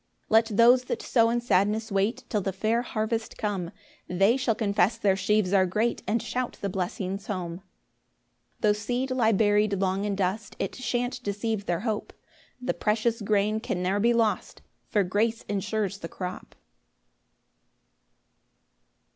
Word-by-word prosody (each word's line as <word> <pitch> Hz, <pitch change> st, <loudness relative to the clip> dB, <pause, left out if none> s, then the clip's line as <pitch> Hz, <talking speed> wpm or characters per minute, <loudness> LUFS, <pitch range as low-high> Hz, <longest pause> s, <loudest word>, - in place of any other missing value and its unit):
5 -, -, -42 dB
Let 225 Hz, +1 st, +6 dB
those 245 Hz, +2 st, +6 dB
that -, -, -3 dB
sow 230 Hz, -2 st, +3 dB
in 240 Hz, +1 st, 0 dB
sadness 215 Hz, 0 st, +1 dB
wait 200 Hz, +4 st, 0 dB
Till 210 Hz, -, 0 dB
the 195 Hz, -, -2 dB
fair 215 Hz, +5 st, 0 dB
harvest 225 Hz, -1 st, -3 dB
come, 195 Hz, -5 st, -2 dB, 0.4 s
They 195 Hz, +6 st, +3 dB
shall 255 Hz, -4 st, +1 dB
confess 205 Hz, 0 st, +1 dB
their 200 Hz, -4 st, +2 dB
sheaves 200 Hz, -1 st, +1 dB
are 190 Hz, -1 st, +4 dB
great, 220 Hz, +6 st, 0 dB
And 225 Hz, +1 st, 0 dB
shout 250 Hz, -1 st, -3 dB
the 200 Hz, -, -2 dB
blessings 190 Hz, +1 st, -3 dB
home. 175 Hz, -4 st, -3 dB
6 190 Hz, -, -18 dB, 1.0 s
Tho' 210 Hz, -1 st, +4 dB
seed 245 Hz, +5 st, -2 dB
lie 240 Hz, -4 st, +3 dB
bury'd 205 Hz, -1 st, +2 dB
long 190 Hz, +1 st, 0 dB
in 205 Hz, -1 st, -1 dB
dust, 195 Hz, +2 st, -2 dB
It -, -, -3 dB
shan't 245 Hz, -1 st, -2 dB
deceive 205 Hz, 0 st, -2 dB
their 175 Hz, 0 st, 0 dB
hope; 220 Hz, -2 st, -3 dB, 0.5 s
The 250 Hz, -, -1 dB
precious 225 Hz, +2 st, 0 dB
grain 210 Hz, +1 st, +1 dB
can 180 Hz, -4 st, -3 dB
ne'er 190 Hz, +3 st, +1 dB
be 235 Hz, +3 st, +4 dB
lost, 230 Hz, -2 st, 0 dB, 0.3 s
For 205 Hz, -, +2 dB
grace 220 Hz, +5 st, 0 dB
insures 205 Hz, -1 st, -2 dB
the 165 Hz, -, -6 dB
crop. 185 Hz, -1 st, -7 dB
210 Hz, 155 wpm, -27 LUFS, 195-230 Hz, 1.0 s, Let